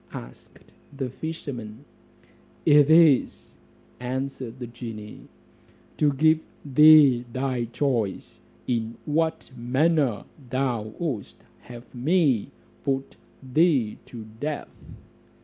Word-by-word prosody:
asked - - -11 0.4
the 130 -3 -3
fisherman. 130 -6 -7 0.8
"It 145 -1 +6
is," 160 -4 +4 0.5
answered 130 -1 -5
the 125 - -6
genie, 115 -3 -9 0.7
"to 150 -1 +4
give 155 +3 +3 0.3
thee 145 -3 +7
thy 130 -1 -2
choice, 120 -4 -2 0.3
in 115 -2 -2
what 160 0 -1
manner 130 -1 +1 0.2
thou 120 -5 -2
wouldst 145 - -5 0.2
have 120 0 -13
me 135 - +1 0.3
put 135 -1 -2 0.4
thee 145 -9 +2
to 115 -3 -9
death." 150 +1 -4
130 Hz, 95 wpm, -25 LUFS, 120-150 Hz, 0.8 s, thee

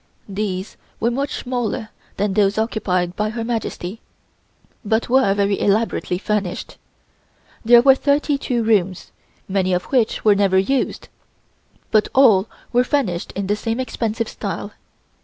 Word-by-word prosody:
These 195 -1 -4 0.2
were 235 - +1
much 275 +3 -2
smaller 245 -2 -3 0.3
than 205 0 0
those 200 0 +2
occupied 185 -5 -1
by 210 0 -1
Her 225 +1 -4
Majesty, 225 -3 -4 0.8
but 220 +2 0
were 255 -6 +3
very 200 -1 +1
elaborately 205 -3 +1
furnished. 200 -2 -3 0.8
There 235 +1 +7
were 270 0 +8
thirty 285 +1 +1
two 240 -4 -1
rooms, 195 -5 0 0.4
many 190 -1 0
of 180 - 0
which 235 -4 +1
were 210 - +7
never 195 -2 +2
used, 260 +8 0 0.8
but 215 -1 +3
all 220 -7 +5 0.2
were 245 +1 +4
furnished 240 -11 -1
in 195 - -3
the 205 +2 +1
same 225 +3 -3
expensive 230 -3 -2
style. - - -5
215 Hz, 140 wpm, -20 LUFS, 195-240 Hz, 0.8 s, were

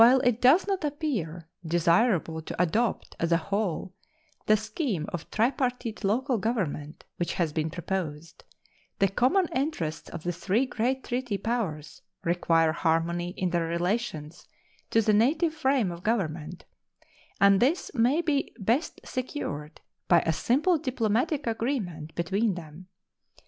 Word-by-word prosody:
While 255 +3 +7
it 245 -3 +1
does 280 +9 +6
not 390 -4 -1
appear 245 - -3 0.2
desirable 170 0 +2
to 160 - -7
adopt 210 +7 0
as 170 0 0
a 170 - +5
whole 190 0 -2 0.5
the 215 - +6
scheme 215 - -2
of 170 -2 -5
tripartite 245 -1 -1
local 240 +5 +1
government 175 -9 -2
which 175 - -1
has 170 -5 -1
been 160 0 -1
proposed, 170 -2 -5 0.5
the 195 - +4
common 255 - +2
interests 250 - -2
of 170 -2 -7
the 175 - 0
three 195 +8 +1
great 260 +2 -1
treaty 245 -4 -2
powers 185 -10 -3 0.2
require 165 -2 +2
harmony 170 +2 0
in 180 -1 0
their 170 -1 0
relations 170 -2 -2 0.4
to 225 - +3
the 215 - +3
native 300 +10 +3
frame 265 - +1
of 170 0 -8
government, 175 -6 -2 0.7
and 200 -1 +6
this 285 - +1
may 265 +7 +2
be 295 -4 0
best 230 - 0
secured 155 - -5 0.3
by 170 -2 +6
a 165 - 0
simple 300 - +2
diplomatic 255 +1 0
agreement 220 - -2
between 195 +4 0
them. 165 +1 -10
200 Hz, 140 wpm, -27 LUFS, 170-250 Hz, 0.7 s, While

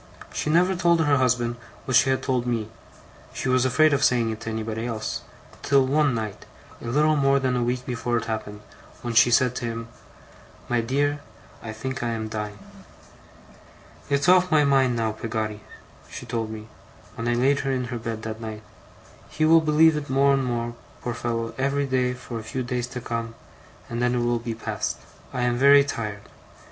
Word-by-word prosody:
She - - -2
never 180 +4 +3
told 170 -1 +3
her 145 -2 +3
husband 120 -2 +1 0.3
what 130 - 0
she 135 - +5
had 130 - 0
told 125 -2 0
me 115 -3 -1 0.7
she 135 - -2
was 130 0 +3
afraid 145 +4 +4
of 140 - +1
saying 120 -2 +3
it 110 - -6
to 115 - -5
anybody 110 +1 -3
else 110 -2 -3 0.4
till 140 -1 +3
one 140 -1 +2
night, 110 -3 -4 0.4
a - - -7
little 150 +5 +3
more 140 -1 +3
than 130 -2 0
a 125 - 0
week 125 +1 -1
before 120 -2 -1
it - - -3
happened, 105 -2 -5 0.4
when 120 -1 -3
she 120 +1 +6
said 125 +1 +3
to 120 - -3
him: 115 0 -5 0.8
"My 120 -1 +1
dear, 145 +5 0 0.4
I 110 - -6
think 130 +5 -5
I 120 - -1
am 110 -1 -4
dying." 105 -1 -5 1.5
'"It's 140 +3 +1
off 185 0 +5
my 155 -2 +4
mind 135 -3 +3
now, 115 -1 0
Peggotty," 110 -1 -4 0.5
she - - -8
told 115 -2 -3
me, 110 0 -8 0.5
when 115 -1 -4
I 120 - +2
laid 135 +4 +3
her 135 - -1
in 125 -1 -2
her 120 - -3
bed 115 -1 -5
that 110 0 -5
night. 110 -1 -6 0.7
"He 155 - 0
will 165 +1 +6
believe 155 +1 +4
it 150 -1 -4
more 140 +1 +4
and 135 -1 +1
more, 120 -1 -2 0.3
poor 120 - -2
fellow, 115 -1 -3
every 140 +1 +1
day 125 -2 0
for 125 -2 -7
a - - -8
few 130 -2 -2
days 125 -1 -2
to 125 0 -7
come; 115 -1 -4 0.5
and 120 0 -4
then 125 0 +2
it 120 - 0
will 120 0 +1
be 115 -1 -4
past. 115 - -3 0.3
I - - -3
am 120 0 +1
very 140 +2 +7
tired. 105 -7 -5
125 Hz, 200 wpm, -24 LUFS, 115-135 Hz, 1.5 s, very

